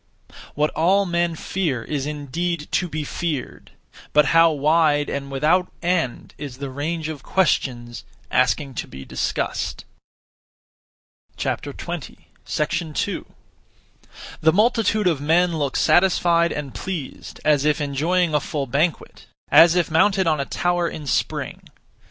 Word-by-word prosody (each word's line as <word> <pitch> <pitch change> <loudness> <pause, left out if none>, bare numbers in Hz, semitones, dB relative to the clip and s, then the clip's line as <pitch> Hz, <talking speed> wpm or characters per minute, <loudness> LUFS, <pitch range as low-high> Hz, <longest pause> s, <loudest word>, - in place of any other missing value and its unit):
What 150 +1 +1
all 190 +5 +2
men 170 -1 0
fear 155 -9 -2
is 145 -2 -3
indeed 150 +3 -3
to 180 - 0
be 155 -1 -3
feared; 150 -2 -4 0.4
but 150 0 +5
how 165 0 +7
wide 150 0 +2
and 140 0 -4
without 155 +7 +1
end 170 -8 -1
is 140 -4 -7
the 140 -1 -6
range 155 +4 -3
of 155 -3 -6
questions 120 -11 0 0.3
(asking 130 +2 +1
to - - -11
be 65 0 -10
discussed)! - - -3 1.5
2. - - 0 2.9
The 160 - +5
multitude 215 +1 +2
of 165 -6 +1
men 165 +3 +2
look 140 -2 -1
satisfied 175 -2 +3
and 145 -3 -5
pleased; 175 -8 -6
as 150 -2 +3
if 150 +1 +2
enjoying 155 +4 0
a 150 - +4
full 145 0 -3
banquet, 150 +6 -2 0.2
as 170 +1 +7
if 175 -2 +1
mounted 190 +4 +3
on 155 -2 +2
a 140 - -1
tower 175 +1 0
in 150 - -8
spring. 135 - -2
155 Hz, 130 wpm, -22 LUFS, 140-175 Hz, 2.9 s, how